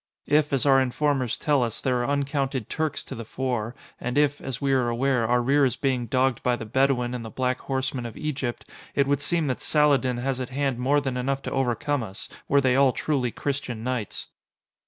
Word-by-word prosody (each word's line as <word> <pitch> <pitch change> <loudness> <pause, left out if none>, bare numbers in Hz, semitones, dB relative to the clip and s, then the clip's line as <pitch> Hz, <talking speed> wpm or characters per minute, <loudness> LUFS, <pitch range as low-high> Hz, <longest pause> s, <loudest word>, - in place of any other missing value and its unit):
If, 150 0 +2
as 135 -1 +1
our 135 -1 +6
informers 130 -1 0
tell 145 -3 +2
us, 115 -2 -2
there 130 -1 0
are 120 - -1
uncounted 140 -4 -1
Turks 155 -2 -2
to - - -7
the 115 - -6
fore, 120 -1 -3 0.2
and 125 +3 -3
if, 145 0 +2
as 130 -3 -4
we 140 -1 +1
are 125 -2 +2
aware, 120 -1 +1
our 120 +1 +2
rear 140 +3 +3
is 125 -3 +2
being 130 -3 -1
dogged 130 +1 +1
by 125 -1 +2
the 115 - -7
Bedouin 125 +1 +1
and 125 -2 -4
the 110 - -6
black 130 +1 -1
horsemen 130 -2 -2
of 115 - -10
Egypt, 135 -5 -3 0.3
it 140 - +3
would 140 0 +1
seem 165 +2 0
that 130 -3 -2
Saladin 140 -5 +3
has 130 +1 -2
at 130 - -4
hand 135 -2 -1
more 140 +4 +2
than 135 -3 -2
enough 135 +2 -1
to - - -4
overcome 135 +2 0
us, 95 -4 -7 0.2
were 140 0 +4
they 130 -2 +3
all 135 -2 +5
truly 135 -4 0
Christian 130 -3 -3
knights." 125 -5 -3
130 Hz, 215 wpm, -25 LUFS, 125-140 Hz, 0.3 s, our